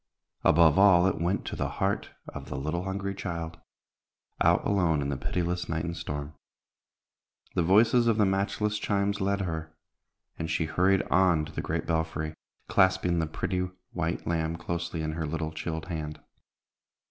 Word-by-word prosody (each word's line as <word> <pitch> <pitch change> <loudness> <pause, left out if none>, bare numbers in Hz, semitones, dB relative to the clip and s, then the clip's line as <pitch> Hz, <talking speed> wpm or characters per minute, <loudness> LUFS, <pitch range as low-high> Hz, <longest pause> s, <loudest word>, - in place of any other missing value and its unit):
Above 80 +1 +5
all, 95 -3 +7
it 95 -4 0
went 90 +4 0
to - - -4
the - - -2
heart - - 0 0.2
of - - -8
the - - -4
little 80 +6 -2
hungry 100 +1 -3
child, 85 -3 -5 0.8
out - - +4
alone 90 -6 +2
in 70 0 -1
the 70 - -1
pitiless 90 +5 -2
night 80 0 -1
and 85 0 -3
storm. 75 -1 -5 1.2
The - - +1
voices 110 +7 +4
of 115 -2 +3
the 105 - +4
matchless 100 +2 0
chimes 100 0 0
led 100 +1 +1
her, 80 -3 -4 0.6
and 80 - -3
she 80 0 0
hurried 90 +4 +2
on 90 -4 +4
to - - -10
the - - -3
great - - -2
belfry, 80 -1 -1 0.3
clasping 95 -2 +3
the 80 - 0
pretty 90 +3 -2 0.2
white 85 -1 -2
lamb 80 -1 0
closely 85 -1 -3
in 80 - -1
her 80 0 -3
little 80 +1 -3
chilled 80 0 -4
hand. 80 -4 -5
85 Hz, 165 wpm, -28 LUFS, 80-95 Hz, 1.2 s, all